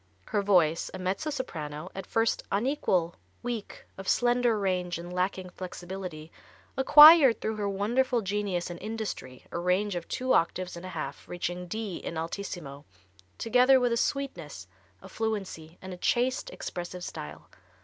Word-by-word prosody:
Her 205 - +1
voice, 175 -5 +3
a - - -4
mezzo 185 +12 -2
soprano, 165 - -5
at 195 -1 -7
first 225 0 +1
unequal, 200 - 0 0.3
weak, 235 -4 -5
of 195 - -8
slender 245 -2 +3
range 180 -3 -1
and 175 +1 -8
lacking 185 0 -2
flexibility, 180 -3 -7 0.4
acquired, 295 -1 +9
through 220 0 -3
her 205 -1 -1
wonderful 235 +5 +1
genius 195 -3 -2
and 175 - -8
industry 215 - -5
a - - -3
range 185 +4 +1
of 175 -1 -5
two 255 0 0
octaves 180 +2 +1
and 170 +2 -8
a 185 - -8
half, 140 -2 -6
reaching 175 0 -4
D 215 -1 -4
in 165 - -6
altissimo, 165 -4 -5 0.5
together 250 +3 +5
with 245 -1 +1
a - - +2
sweetness, 175 - -3 0.4
a - - -9
fluency, 195 -7 -4
and 185 0 -6
a - - -8
chaste, 255 - 0
expressive 180 - -6
style. 75 - -8
190 Hz, 150 wpm, -28 LUFS, 175-230 Hz, 0.5 s, acquired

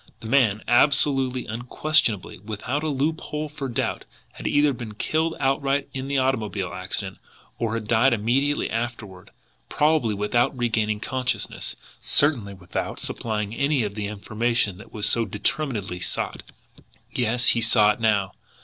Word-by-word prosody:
The - - -12
man, 110 -4 +3
absolutely, 135 0 +3
unquestionably, 120 - 0
without 110 +7 -3
a 155 - -2
loophole 150 +1 -2
for 145 -2 -5
doubt, 120 - -2 0.3
had - - -6
either 145 -1 +3
been 115 -4 -7
killed 160 +8 0
outright 135 0 +1
in 130 0 -4
the 140 0 0
automobile 110 -8 0
accident, 95 +1 -4 0.4
or 115 -1 0
had 110 -2 -4
died 120 +4 +4
immediately 125 +6 +1
afterward, 110 -5 -5 0.4
probably 150 -8 +2
without 120 +6 +1
regaining 110 -3 0
consciousness, 130 +1 -2 0.2
certainly 120 -10 +1
without 90 -2 -4
supplying 105 -2 -2
any 140 -1 +1
of 105 -1 -3
the 105 -1 -3
information 105 0 -1
that 110 - -13
was 105 -1 -2
so 115 - +3
determinedly 105 -1 -2
sought. - - -3 0.7
Yes, 120 0 +2
he 115 - +2
saw 110 -2 +5
it 105 - -5
now! 105 -4 +2
120 Hz, 140 wpm, -24 LUFS, 105-135 Hz, 0.7 s, saw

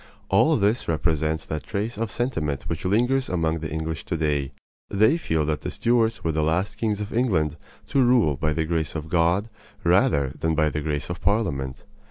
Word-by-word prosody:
All - - +4
this 105 +5 +1
represents 80 -1 0
that 75 -1 -4
trace 110 +3 -3
of 115 +1 -2
sentiment 80 - -2
which 85 +1 -5
lingers 125 +7 +2
among 80 -2 0
the 75 -1 -4
English 80 0 -3
to 85 - -2
day. 75 -3 0 0.4
They 110 +8 +4
feel 80 - 0
that 75 -2 -1
the - - -4
Stuarts 115 -2 +1
were 80 - +1
the 80 0 0
last 80 +6 0
kings 105 -2 0
of 105 - -5
England 90 - +1 0.3
to 140 - +3
rule 120 - +4
by 75 +3 0
the 80 +1 -1
grace 80 -2 -2
of 80 0 -5
God 85 +5 +2 0.4
rather 70 -2 +3
than 80 -1 0
by 75 -1 +2
the 75 - -2
grace 75 +2 -2
of 85 - -6
Parliament. 70 - -1
80 Hz, 195 wpm, -24 LUFS, 75-105 Hz, 0.4 s, All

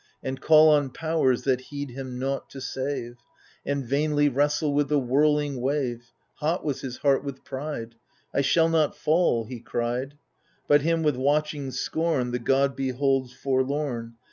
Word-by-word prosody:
And 130 0 -4
call 155 0 +7
on 145 -3 +3
Powers, 155 -4 0
that 130 -2 +1
heed 145 0 -6
him 130 0 -6
nought, 135 +2 -3
to 135 - -9
save, 130 -2 -4 0.5
And 140 -2 -2
vainly 145 +3 +2
wrestle 145 +2 +1
with 145 -1 +1
the 150 - +3
whirling 145 +1 +1
wave. 125 -4 -2 0.3
Hot 160 +4 -1
was 145 -4 -2
his 130 -2 -6
heart 140 -1 +2
with 140 -2 -7
pride 130 -4 -5 0.2
— - - -39
I - - +2
shall 160 +4 +3
notfall^ 155 -5 +1
he 125 -1 -7
cried. 125 +3 -3 0.5
But 145 0 +5
him 165 +2 +1
with 150 -4 +1
watching 145 +1 0
scorn 150 -2 -1
The 125 - -1
god 135 +3 +2
beholds, 135 -1 0
forlorn. 130 -2 -2
140 Hz, 160 wpm, -26 LUFS, 130-150 Hz, 0.5 s, call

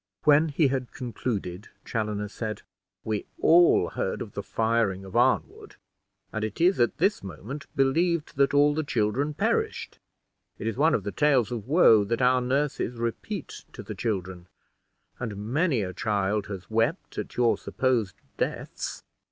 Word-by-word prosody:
When 150 +2 +5
he 145 0 +2
had 130 -2 -3
concluded, 110 -6 -4 0.2
Chaloner 105 -2 -2
said, 110 +1 -5 0.4
"We 110 -2 -3
all 170 +1 +5
heard - - -3
of - - -11
the - - -3
firing 110 -4 0
of 95 - -10
Arnwood, - - +1 0.6
and 110 - -2
it 110 - -4
is 180 +3 +3
at 120 - +2
this 195 +5 +2
moment 105 - -8
believed 155 +4 +1
that 140 0 +4
all 145 +1 +4
the 155 - 0
children 135 +4 0
perished. - - -1 0.6
It - - -7
is 115 - -1
one 155 +4 +3
of 105 - -2
the 100 - -3
tales 135 -5 +2
of 115 -3 -5
woe 130 - +6
that 115 +3 -1
our 125 0 +4
nurses 135 0 -1
repeat 115 0 -4
to - - -8
the - - -6
children, 95 -5 -3 0.7
and 110 -5 -4
many 125 - 0
a 90 -1 -5
child 100 +1 -1
has 95 -3 -7
wept 115 - -1
at - - -6
your 120 -1 +4
supposed 120 -8 -1 0.2
deaths. - - -4
120 Hz, 160 wpm, -26 LUFS, 105-145 Hz, 0.7 s, woe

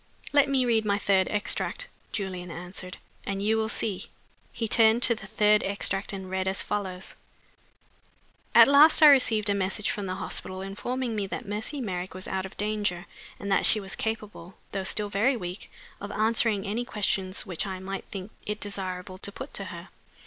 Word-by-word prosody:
"Let 285 -1 +5
me 265 -2 +2
read 225 -2 +2
my 200 -1 +1
third 195 -2 +2
extract," 210 - -1 0.2
Julian 185 -4 -4
answered, 180 +2 -7 0.3
"and 195 -1 -3
you 215 +2 +2
will 220 0 0
see." 200 -4 -2 0.4
He 230 -1 -3
turned 225 +2 +4
to 240 - +5
the 215 -3 -9
third 210 +1 +3
extract, 195 0 -1
and 190 -2 -6
read 190 0 -2
as 190 0 +2
follows: 190 -3 -3 1.4
"'At - - +10
last 300 +3 +7
I 300 - +11
received 225 -6 +4
a 200 - +4
message 195 +2 0
from 205 -5 -4
the 185 - -3
hospital 185 0 -5
informing 240 +5 -3
me 205 -2 -1
that 235 +3 -6
Mercy 215 +8 -3
Merrick 185 -4 -4
was 185 - -5
out 190 0 -2
of - - -17
danger, 205 -4 0 0.3
and 200 -1 -4
that 195 - +3
she 215 - +6
was 195 -2 -5
capable 210 -5 -5 0.2
(though 195 -1 -2
still 205 +1 +1
very 225 +7 +2
weak) 180 -1 -7 0.3
of 200 +1 -6
answering 220 -1 +2
any 215 +4 -2
questions 195 -5 0
which 190 +1 -3
I 190 -1 -4
might 195 +1 -6
think 195 +1 -7
it 210 +1 -4
desirable 185 -2 -5
to 200 - -2
put 265 +7 -8
to - - -3
her. - - -9
200 Hz, 185 wpm, -27 LUFS, 190-220 Hz, 1.4 s, I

